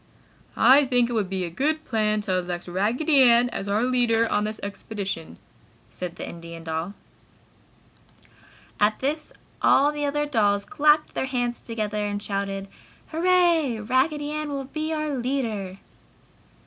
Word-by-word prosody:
"I 275 +2 +6
think 245 -2 +2
it - - -2
would 210 -5 0
be 190 -1 -2
a 170 - -6
good 310 - -1
plan 215 -2 0
to 185 -3 0
elect 175 0 -5
Raggedy 240 - +2
Ann 240 -1 +5
as 200 - -5
our 205 +3 +1
leader 240 -2 +2
on 205 0 +1
this 215 0 -4
expedition!" 200 -4 -5 0.5
said 180 -1 -6
the - - -7
Indian 170 -1 -9
doll. 165 +4 -4 1.8
At 210 +1 +3
this 300 +3 -2 0.3
all 285 +2 +5
the 295 -1 -2
other 295 +1 0
dolls 205 -7 +1
clapped 300 +2 +2
their 265 - -2
hands 245 -2 -2
together 215 -2 -3
and 205 0 -2
shouted, 195 -1 -3 0.4
"Hurrah! 330 -9 +2
Raggedy 290 +4 +1
Ann 305 0 -3
will 280 -1 -3
be 310 +3 -4
our 305 -2 -2
leader." 230 -7 -2
235 Hz, 150 wpm, -24 LUFS, 200-290 Hz, 1.8 s, I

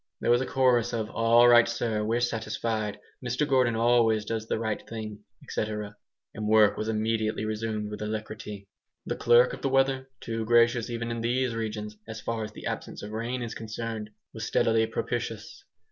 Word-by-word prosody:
There - - +1
was 120 +1 +4
a 130 - -2
chorus 125 -4 +2
of 110 -2 -2
"All 115 +1 +5
right 120 -1 +7
sir, 115 -2 -1
we're 115 +3 0
satisfied. 110 -2 -2 0.2
Mr 125 +4 0
Gordon 130 -4 +3
always 115 -2 +3
does 110 0 -3
the - - 0
fair 110 -1 -1
thing." 110 -2 -7 0.3
&c. - - -2
And 105 0 -6
work 110 -1 +5
was 110 - -3
immediately 110 0 0
resumed 110 -1 -3
with 105 - -6
alacrity. 105 -1 -5 0.4
The - - -2
clerk 120 +1 +5
of - - -7
the 135 - 0
weather, 135 0 +2
too 115 -1 -3
gracious 120 0 +4
even 115 0 -3
in 115 0 -3
these 125 +1 0
regions 105 -2 -4
as 110 -1 -6
far 115 0 -3
as 105 - -6
the - - -10
absence - - -5
of 105 - -6
rain 120 +3 -3
is 115 -1 -5
concerned, 110 -1 -5 0.2
was 110 - -6
steadily 115 +1 +2
propitious. - - -4
115 Hz, 180 wpm, -28 LUFS, 110-120 Hz, 0.4 s, right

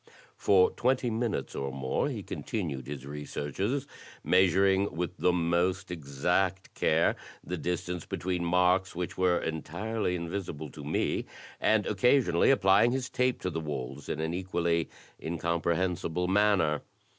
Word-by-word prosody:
For 95 -2 +4
twenty 125 -1 +1
minutes 115 -1 -2
or 70 0 -3
more 65 -1 -1
he - - -5
continued 75 - -4
his 70 -2 -6
researches, 75 - -3 0.4
measuring 95 +2 +3
with 90 +1 -3
the 90 - +3
most 90 +2 0
exact 90 +5 -1
care - - +2 0.3
the 90 - -4
distance 90 0 -3
between 90 -1 -2
marks 90 +2 +2
which 90 0 -3
were 90 -1 +3
entirely 90 +6 -2
invisible 85 -4 -5
to 75 - -10
me, 75 +2 -1 0.3
and 110 -2 +3
occasionally 105 -3 +3
applying 105 -2 +5
his 130 -2 -2
tape 125 0 +1
to 90 - -2
the 80 - -2
walls 70 -3 -5
in - - -2
an 80 +1 -1
equally 85 -2 0 0.3
incompre 85 +1 -1
hensible 90 -1 -1
manner. 95 -6 +3
90 Hz, 135 wpm, -29 LUFS, 80-95 Hz, 0.4 s, applying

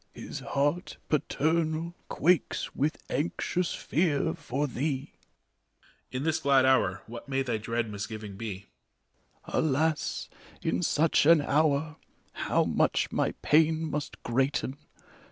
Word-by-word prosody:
His - - -7
heart 140 +5 -1
paternal 160 +2 0 0.2
quakes 170 0 +1
with 150 +3 -1
anxious 170 +4 -1
fear 155 -3 +1
for 140 +5 -2
thee. 140 +1 -2
EMPEROR. - - -37 0.3
In 130 - -2
this 160 0 +1
glad 135 -2 +4
hour 95 -8 +3
what 120 +4 -9
may 135 0 +1
thy 120 -4 -1
dread 115 +1 -1
misgiving 105 0 -6
bet 115 +3 -5 1.0
ARCHBISHOP. - - -11
Alas, 155 +1 0 0.3
in 85 +2 0
such 150 - +3
an 165 -2 +7
hour, 150 +1 +1 0.3
how - - +1
much - - +1
my - - 0
pain 160 +1 +3
must 150 0 -4
greaten. 135 +2 0
145 Hz, 125 wpm, -29 LUFS, 130-155 Hz, 1.0 s, an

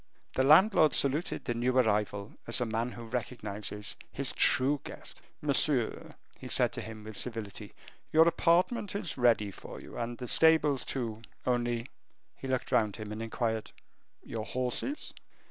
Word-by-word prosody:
The - - +1
landlord 155 +2 +6
saluted 140 +5 +2
the 120 - -1
new 125 +2 0
arrival 105 -3 +1
as 115 - +1
a 125 - 0
man 115 +2 -2
who 120 - -9
recognizes 105 -3 -3 0.2
his - - -2
true 140 +2 +3
guest. - - -10 0.2
"Monsieur," 140 -4 +1 0.2
he - - -8
said - - +3
to - - -2
him, 110 -1 -9
with 110 0 -8
civility, 115 -3 -4 0.4
"your 160 +1 +6
apartment 180 +6 +2
is 185 -6 -3
ready 115 -5 +3
for - - -10
you, - - -9
and 120 0 -3
the 125 - -6
stables 155 -2 +4
too, 115 -4 -3 0.2
only 120 -1 0 0.2
" - - -44
He 135 - -5
looked 130 -1 -2
round 105 -3 +2
him 110 -1 -7
and 105 +1 -5
inquired, 115 -1 -2 0.5
"Your 110 -1 -5
horses?" 130 - -3
120 Hz, 160 wpm, -30 LUFS, 110-140 Hz, 0.5 s, landlord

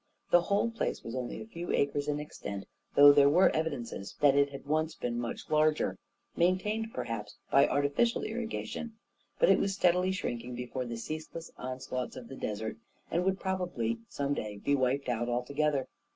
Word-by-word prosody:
The 175 - +7
whole 200 +5 +1
place 230 - -2
was 115 - -6
only 125 -1 -4
a - - -7
few 175 -5 -5
acres 140 0 +1
in 150 0 0
extent, 100 -9 -6 0.3
though 145 0 +10
there 140 0 +6
were 175 +6 +5
evidences 135 -10 -3
that 145 -2 +6
it 140 0 +4
had 140 0 -9
once 155 +2 0
been 120 -1 -2
much 120 -1 -4
larger 155 0 +2 0.2
— - - -44
maintained, 200 +6 +1
perhaps, 105 - -5
by 140 +1 +6
artificial 145 +12 +1
irrigation; 230 0 -4 0.4
but - - +4
it - - +6
was 195 -1 0
steadily 180 0 +3
shrinking 120 -9 -3
before 125 +1 -4
the 120 -1 -4
ceaseless 155 +5 -6
on 130 0 -5
slaughts 130 -1 -4
of 125 -3 -9
the 135 - -7
desert, 110 -2 -4 0.3
and 170 +2 +1
would 190 0 +1
probably, 175 - -1
some 140 0 -1
day, 105 -6 -4
be 140 +8 0
wiped 135 +1 +1
out 120 0 -1
altogether. 140 +3 0
145 Hz, 180 wpm, -31 LUFS, 125-175 Hz, 0.4 s, though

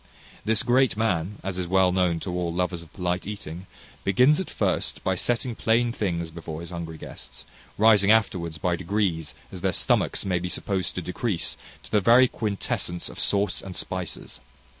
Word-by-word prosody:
This 110 +1 +3
great 125 -2 +3
man, 105 -3 0
as 95 -1 -3
is 90 - -2
well 95 0 +4
known 90 -2 +2
to 90 - -4
all 90 -1 -1
lovers 90 0 -1
of 80 -2 -14
polite 90 0 -2
eating, 95 -3 -7 0.4
begins 125 +10 +4
at 190 - -3
first - - -1
by 95 - +1
setting 120 +6 -1
plain 115 +2 +2
things 85 -7 -2
before 80 -1 -7
his 85 - -8
hungry 85 -2 -6
guests, 60 -4 -10 0.3
rising 105 -2 +5
afterwards 90 -7 +2
by 85 +2 0
degrees 85 -5 -1 0.2
as 95 - -8
their 95 - +2
stomachs - - +1
may 90 -2 +1
be 90 +1 -3
supposed 95 0 -2
to 90 - -3
decrease, 90 +2 -2 0.3
to - - -12
the 105 - +3
very 120 +5 +7
quintessence 100 -6 -2
of - - -9
sauce 100 0 +1
and 95 -2 -8
spices. 95 -2 -5
95 Hz, 180 wpm, -26 LUFS, 85-105 Hz, 0.4 s, very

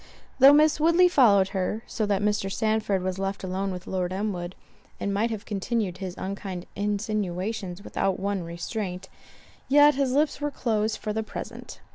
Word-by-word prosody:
Though 270 +2 +9
Miss 305 +1 +4
Woodley 335 +3 +5
followed 210 - +5
her, 195 +3 -2
so 215 -2 -2
that 200 -1 0
Mr. 205 -2 0
Sandford 215 -2 0
was 185 0 -2
left 195 0 -3
alone 190 +1 -2
with 180 0 -7
Lord 185 -1 -2
Elmwood, 185 -2 -3 0.4
and 200 - -2
might 215 +4 +1
have 220 -1 -5
continued 205 -2 -2
his 185 -2 -6
unkind 190 -2 -5
insinuations 200 -2 -2
without 195 -3 -1
one 200 -1 -1
restraint, 180 +2 -5 0.6
yet 290 +2 +7
his 270 -1 0
lips 295 +1 +1
were 295 - 0
closed 220 -5 -1
for 210 - -4
the 220 - -1
present. 215 - -8
205 Hz, 165 wpm, -26 LUFS, 190-225 Hz, 0.6 s, Though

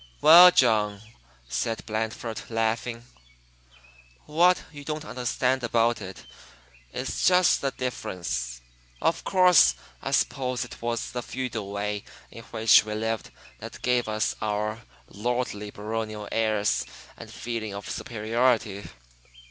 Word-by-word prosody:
"Well, 175 +3 +10
John," 110 - +2 0.4
said 115 - -2
Blandford, 110 +1 -3
laughing, 115 +1 -2 1.2
"what 175 +4 +3
you 145 -2 -10
don't 155 +1 -4
understand 125 0 -1
about 115 -1 +1
it 95 -1 -9 0.7
is - - -1
just 180 -1 +4
the 135 - 0
difference, 85 - -4 0.4
of - - 0
course. 180 -3 +5 0.3
I - - -4
suppose 125 -2 0
it 120 - -12
was 115 0 -2
the 125 - -3
feudal 120 -5 -5
way 105 0 -3 0.3
in - - -11
which 110 0 +5
we 105 0 -5
lived 110 +1 -2 0.3
that - - -10
gave 125 -1 +1
us 110 0 -1
our 105 +1 -2 0.3
lordly 110 -2 -3
baronial 110 0 -5
airs 110 -2 +1 0.3
and - - -11
feeling 110 -3 -5
of 100 - -7
superiority." 115 -2 -1
115 Hz, 120 wpm, -26 LUFS, 105-125 Hz, 1.2 s, Well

